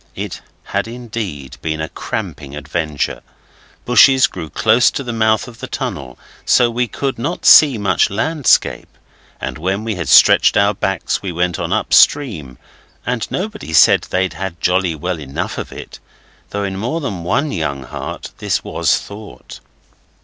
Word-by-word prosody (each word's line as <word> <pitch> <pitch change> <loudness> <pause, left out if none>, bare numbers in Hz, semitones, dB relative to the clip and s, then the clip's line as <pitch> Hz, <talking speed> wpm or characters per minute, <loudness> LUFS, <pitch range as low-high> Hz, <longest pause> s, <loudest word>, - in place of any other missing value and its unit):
It - - -6 0.2
had - - -3
indeed 110 - -6
been 80 -1 -3
a 80 - -3
cramping 70 -1 -6
adventure. 75 -4 -3 0.6
Bushes 130 +2 +6
grew 80 - -6
close 110 +6 +3
to 140 - -5
the 120 -2 -5
mouth 110 -1 +1
of 120 -1 -13
the - - -6
tunnel, 65 -2 -5 0.3
so 120 -1 +3
we 120 +1 -1
could 135 +1 -3
not 145 +9 -4
see 140 -6 +8
much 100 -3 +1
landscape, 145 +8 +1 0.5
and - - -5
when 95 +5 -2
we 110 -1 -2
had 90 -3 -4
stretched - - +6
our 100 0 +3
backs 95 -2 -2
we 95 - -4
went 90 0 -1
on - - -3
upstream 80 - +2 0.5
and 120 -3 -2
nobody 210 - -5
said 75 - +5
they'd 95 -2 0
had 90 +1 -6
jolly 90 -1 +1
well 90 +2 -4
enough 70 -2 -5
of - - -6
it, - - -10 0.5
though 100 0 -3
in 95 -1 -3
more 125 +11 -2
than 105 - -5
one 140 - 0
young 70 -6 -3
heart - - -7
this - - -1
was - - +1
thought. 105 +1 -11
100 Hz, 160 wpm, -17 LUFS, 80-120 Hz, 0.6 s, see